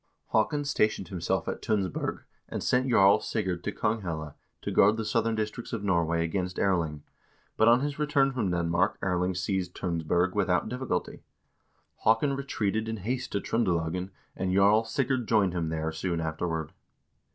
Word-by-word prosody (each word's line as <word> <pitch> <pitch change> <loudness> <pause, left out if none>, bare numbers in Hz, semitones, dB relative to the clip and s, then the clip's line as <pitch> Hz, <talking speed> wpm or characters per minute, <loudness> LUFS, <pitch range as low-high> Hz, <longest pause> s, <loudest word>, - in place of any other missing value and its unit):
Haakon 145 +7 +1
stationed 110 - 0
himself 90 -3 -1
at - - -3
Tunsberg, 100 -6 -1 0.3
and - - -4
sent 130 +1 +2
Jarl 100 -3 +6
Sigurd 95 -6 -2
to - - -2
Konghelle 85 -9 -2 0.3
to - - -2
guard 105 +3 +5
the 110 - -2
southern 115 0 +1
districts 110 +3 -4
of 110 -3 -3
Norway 85 -3 +1
against 90 +1 -3
Erling, 80 -6 0 0.5
but 110 - +4
on 120 +2 +6
his 145 0 -3
return 145 -2 +2
from 120 -7 -1
Denmark 85 0 +1
Erling 90 0 0
seized 90 0 -2
Tunsberg 85 +1 0
without 95 -2 +1
difficulty. 125 -7 -3 0.8
Haakon 125 +6 +3
re 140 - -4
treated 110 -3 -1
in 110 - -3
haste 125 +5 -3
to 100 - +1
Tr0ndelagen, 90 -5 -1 0.3
and 95 -1 -1
Jarl 105 +3 +5
Sigurd 130 0 -1
joined 100 -5 +3
him 85 -3 -1
there 80 0 -2
soon 85 +1 -2
afterward. 80 -1 -3
95 Hz, 160 wpm, -28 LUFS, 85-115 Hz, 0.8 s, Jarl